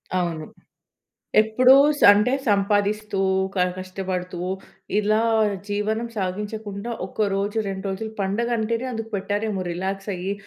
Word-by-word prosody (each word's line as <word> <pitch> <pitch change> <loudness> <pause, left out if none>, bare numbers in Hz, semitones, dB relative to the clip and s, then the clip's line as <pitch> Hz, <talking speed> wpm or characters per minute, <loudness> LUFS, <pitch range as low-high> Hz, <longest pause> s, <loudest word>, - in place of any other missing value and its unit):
అవును. 170 -3 -1 1.0
ఎప్పుడూ‌స్ 260 +7 +5
అంటే 210 +5 +2
సంపాదిస్తూ 205 0 +1 0.4
క 180 -2 +2
కష్టపడుతూ 185 -1 -4 0.6
ఇలా 215 +1 +2 0.5
జీవనం 215 +3 -1
సాగించకుండా 205 +3 -4
ఒక 205 +1 -1
రోజు 200 +2 -1
2 195 0 -4
రోజులు 220 +3 -4
పండగ 205 +5 -1
అంటేనే 230 +3 -1
అందుకు 225 -1 -5
పెట్టారేమో 205 0 -2
రిలాక్స్ 195 +3 -3
అయ్యి 185 +2 -3
205 Hz, 110 wpm, -23 LUFS, 190-220 Hz, 1.0 s, ఎప్పుడూ‌స్